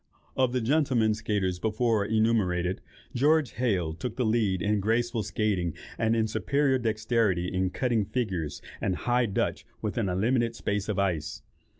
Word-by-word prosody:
Of 130 Hz, -2 st, +2 dB
the 125 Hz, 0 st, 0 dB
gentlemen 125 Hz, -4 st, +2 dB
skaiters 100 Hz, -4 st, -1 dB
before 110 Hz, -1 st, +1 dB
enumerated, 100 Hz, -5 st, +1 dB, 0.3 s
George 145 Hz, +2 st, +3 dB
Heyl 95 Hz, -10 st, 0 dB
took 115 Hz, +7 st, -5 dB
the 125 Hz, -, 0 dB
lead 110 Hz, -4 st, +1 dB
in 105 Hz, +3 st, +1 dB
graceful 115 Hz, +3 st, 0 dB
skaiting, 100 Hz, -5 st, -1 dB, 0.2 s
and 110 Hz, 0 st, +1 dB
in 110 Hz, -1 st, +2 dB
superior 130 Hz, +6 st, +1 dB
dexterity 110 Hz, -5 st, +1 dB
in 95 Hz, 0 st, +1 dB
cutting 115 Hz, 0 st, 0 dB
figures 95 Hz, -, -3 dB, 0.2 s
and 95 Hz, -, 0 dB
High 120 Hz, +4 st, +1 dB
Dutch 100 Hz, -, -1 dB, 0.2 s
within 95 Hz, -, -1 dB
a 90 Hz, -, -1 dB
limited 115 Hz, +3 st, +1 dB
space 105 Hz, -1 st, -2 dB
of 105 Hz, -, -1 dB
ice. 95 Hz, -6 st, -1 dB
110 Hz, 155 wpm, -28 LUFS, 95-120 Hz, 0.3 s, George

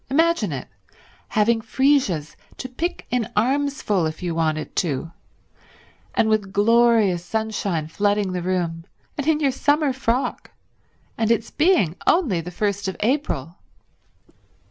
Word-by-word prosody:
Imagine 320 Hz, -, +2 dB
it— 135 Hz, -3 st, -5 dB, 0.6 s
having 225 Hz, +2 st, +2 dB
freesias 255 Hz, -, +1 dB, 0.2 s
to 255 Hz, -, -5 dB
pick 325 Hz, +8 st, -4 dB
in 240 Hz, -2 st, -1 dB
armsful 250 Hz, -, +1 dB
if 155 Hz, +3 st, -7 dB
you 175 Hz, -2 st, -1 dB
wanted 155 Hz, -1 st, -1 dB
to, 165 Hz, -1 st, -1 dB, 1.0 s
and 220 Hz, -, +3 dB
with 215 Hz, -3 st, +1 dB
glorious 215 Hz, -3 st, +3 dB
sunshine 205 Hz, -6 st, -2 dB
flooding 205 Hz, +4 st, 0 dB
the 180 Hz, -1 st, -2 dB
room, 170 Hz, -2 st, -2 dB, 0.3 s
and 290 Hz, 0 st, -3 dB
in 315 Hz, -1 st, +3 dB
your 280 Hz, -3 st, +2 dB
summer 290 Hz, +1 st, +1 dB
frock, 255 Hz, 0 st, -1 dB, 0.7 s
and 225 Hz, -1 st, +1 dB
its 230 Hz, -1 st, +1 dB
being 300 Hz, -, +3 dB
only 255 Hz, -, +3 dB
the 170 Hz, -, -7 dB
first 200 Hz, +2 st, -2 dB
of 190 Hz, -, -4 dB
April! 210 Hz, -, -1 dB
215 Hz, 130 wpm, -22 LUFS, 175-265 Hz, 1.0 s, and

